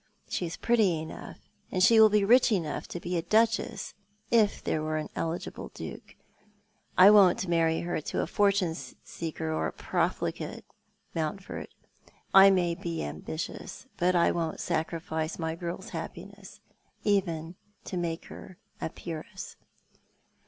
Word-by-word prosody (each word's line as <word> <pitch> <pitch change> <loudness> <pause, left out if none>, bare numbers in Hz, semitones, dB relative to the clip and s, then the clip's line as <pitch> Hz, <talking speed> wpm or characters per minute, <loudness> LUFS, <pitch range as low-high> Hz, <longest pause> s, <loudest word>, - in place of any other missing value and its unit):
She 175 - -2
is 165 - -6
pretty 215 -9 +2
enough, 160 - -8 0.3
and 185 -1 +2
she 225 +3 +7
will 220 0 +9
be 210 -1 +3
rich 240 +3 +5
enough 165 -8 -1
to 175 - -6
be 175 +1 -2
a - - +1
Duchess 225 +5 +1 0.2
— 205 +1 -37
if 205 - -9
there 155 - 0
were 155 0 -1
an 155 - -4
eligible 165 +1 -4
Duke. - - -8 0.8
I 190 +3 +9
won't 195 -3 +5
marry 165 -1 +2
her 175 -2 -2
to - - -2
a - - 0
fortune 195 -2 +2
seeker 160 -1 -6
or - - 0
a - - -4
profligate, - - -2 0.5
Monntford. 165 +4 -4 0.7
I 195 0 +10
may 180 -3 +2
be 170 0 -4
ambitious, 80 - -6
but 180 +1 +2
I 170 - +4
won't 165 -2 -2
sacrifice 160 0 -2
my 160 -1 -2
girl's 170 +1 -6
happiuesSj - - -8 0.4
even 170 -5 0 0.3
to - - -6
make 170 -2 -2
her 185 - -11 0.2
a - - -2
peeress." 160 -1 -8
170 Hz, 145 wpm, -29 LUFS, 160-195 Hz, 0.8 s, I